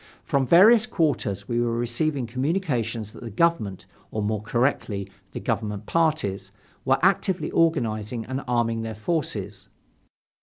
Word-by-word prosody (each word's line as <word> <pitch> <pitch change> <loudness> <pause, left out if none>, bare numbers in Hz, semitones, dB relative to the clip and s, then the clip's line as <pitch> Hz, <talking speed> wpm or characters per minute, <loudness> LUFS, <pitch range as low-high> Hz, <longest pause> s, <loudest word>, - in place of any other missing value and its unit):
From 135 -2 0
various 215 - +7
quarters 150 - -1
we 120 -1 0
were 115 -1 0
receiving 125 +3 -1
communications 125 - -2
that - - -13
the 115 - -6
government, 110 - 0 0.2
or 110 - -3
more 105 0 -1
correctly, 115 -3 -1 0.2
the - - -5
government 105 -2 -2
parties, 155 -13 0 0.3
were - - +4
actively 185 -1 +2
organizing 115 -8 0
and 130 +1 -4
arming 115 -2 +1
their 110 -1 -5
forces. 155 +8 -3
120 Hz, 130 wpm, -25 LUFS, 110-155 Hz, 0.3 s, various